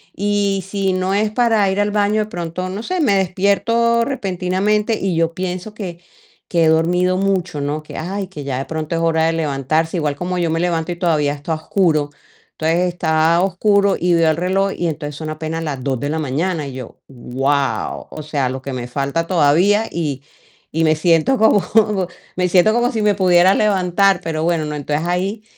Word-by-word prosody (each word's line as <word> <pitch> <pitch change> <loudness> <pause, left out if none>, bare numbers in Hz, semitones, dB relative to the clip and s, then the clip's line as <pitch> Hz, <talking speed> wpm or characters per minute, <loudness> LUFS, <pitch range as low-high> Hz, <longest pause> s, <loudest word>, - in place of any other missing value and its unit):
y 200 -1 0
si 195 -1 -1
no 185 +1 -1
es 210 +2 +1
para 220 -3 +2
ir 190 +1 -1
al 205 0 0
baño, 210 +1 +1
de - - -6
pronto, 175 +1 -4
no 195 +3 -5
sé, 365 +10 -3
me 230 -10 +3
despierto 200 +5 +1
repentinamente 205 -1 0
y 190 -3 -1
yo 165 0 0
pienso 185 +3 -4
que 175 -5 -7 0.5
que 170 -2 +3
he - - +4
dormido 175 +3 +2
mucho, 190 -6 -1
¿no?, 145 +2 -3
que: - - -11
"Ay", 195 +5 -3
que 180 -6 -8
ya 135 -2 -3
de 135 - -3
pronto 160 +1 -4
es 165 - -1
hora 160 -1 +2
de 165 - +1
levantarse, 155 +2 -1
igual 150 -3 -1
como 180 +3 -3
yo 170 -2 0
me 165 - 0
levanto 170 -1 -1
y - - -3
todavía 160 -5 +1
está 145 +3 -4
oscuro, 155 -2 +1 0.4
entonces 160 +2 0
está 160 -1 +2
oscuro 200 +1 +2
y 175 0 +2
veo 165 -1 +4
el 155 - -1
reloj 190 +3 0
y 175 - -1
entonces 150 -2 -4
son 155 +1 -6
apenas 160 +1 -4
las 140 -5 -4
2:00 130 -3 -1
de 145 - -3
la 155 - -1
mañana 155 +3 -2
y 135 - -7
yo: 130 -3 -9
"¡Guau! 135 +2 -2
O 155 - -8
sea, 145 -4 -1
lo 130 0 -6
que 135 - -5
me 125 -1 -4
falta 140 +6 -2
todavía", 180 +6 +3
y 145 -5 -3 0.5
y 160 +1 0
me 155 -1 +3
siento 165 - +2
como 220 -2 +4 0.7
me 180 0 +1
siento 185 +4 +4
como 240 +2 +1
si 220 -4 -2
me 210 -1 +4
pudiera 185 -1 +4
levantar, 195 -2 +2
pero 160 -1 -2
bueno, 165 -2 0
¿no?, 150 - -4
entonces 150 +2 -2
ahí 190 +5 -2
175 Hz, 200 wpm, -19 LUFS, 155-195 Hz, 0.7 s, he